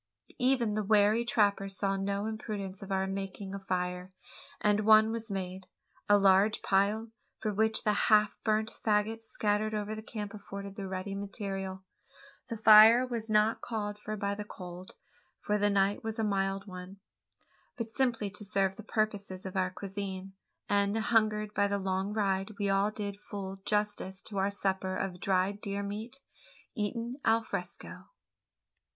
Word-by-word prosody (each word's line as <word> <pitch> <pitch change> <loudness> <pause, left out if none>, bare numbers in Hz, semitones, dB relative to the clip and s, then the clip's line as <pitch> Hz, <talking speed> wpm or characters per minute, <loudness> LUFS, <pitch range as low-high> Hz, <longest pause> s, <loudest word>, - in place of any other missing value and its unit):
Even 250 -4 +2
the 215 0 0
wary 210 +2 +4
trapper 205 -4 +2
saw 195 0 0
no 200 +1 -1
imprudence 210 -3 -5
in 195 0 -8
our 190 0 +1
making 195 0 -5
a 200 - -4
fire, 180 -1 -3 0.5
and 210 0 +3
one 215 +1 +6
was 230 0 -4
made 190 -1 -5 0.4
a 205 - +7
large 195 +2 +4
pile, 205 +3 +2 0.3
for 215 - -2
which 220 +2 +2
the 210 - +3 0.2
half 210 -1 +5
burnt 220 0 +1
faggots 220 +1 +1
scattered 215 0 0
over 210 0 -2
the 215 - -6
camp 210 -2 -6
afforded 200 -1 -8
the 195 -1 -5
ready 190 +1 -4
material. 195 -1 -5 0.6
The 230 - -4
fire 220 +3 +8
was 230 -3 -4
not 215 +1 +3
called 210 -2 -4
for 215 0 -5
by 200 0 -1
the 210 +1 -5
cold 180 -2 -10 0.4
for 210 0 0
the 205 0 +3
night 200 0 +2
was 225 0 -3
a 225 - 0
mild 195 -1 0
one 185 0 -9 0.8
but 230 -2 -4
simply 230 -6 0
to 210 +1 -9
serve 195 -2 0
the 220 - -8
purposes 205 -4 -2
of 190 - -6
our 185 -1 +1
cuisine; 195 0 -6 0.3
and, 200 +1 +2
hungered 215 -2 +1
by 205 -1 +2
the 200 0 0
long 190 +1 -1
ride, 200 -1 -1
we 200 -2 0
all 195 +1 +3
did 205 -2 -5
full 195 -2 -6
justice 210 -2 -1
to 200 -3 -4
our 195 +1 +2
supper 190 -2 -1
of 180 -2 -3
dried 195 +2 +1
deer 200 0 -3
meat, 220 +7 -6 0.5
eaten 230 +3 -3
alfresco. 200 -6 -2
205 Hz, 160 wpm, -31 LUFS, 195-215 Hz, 0.8 s, fire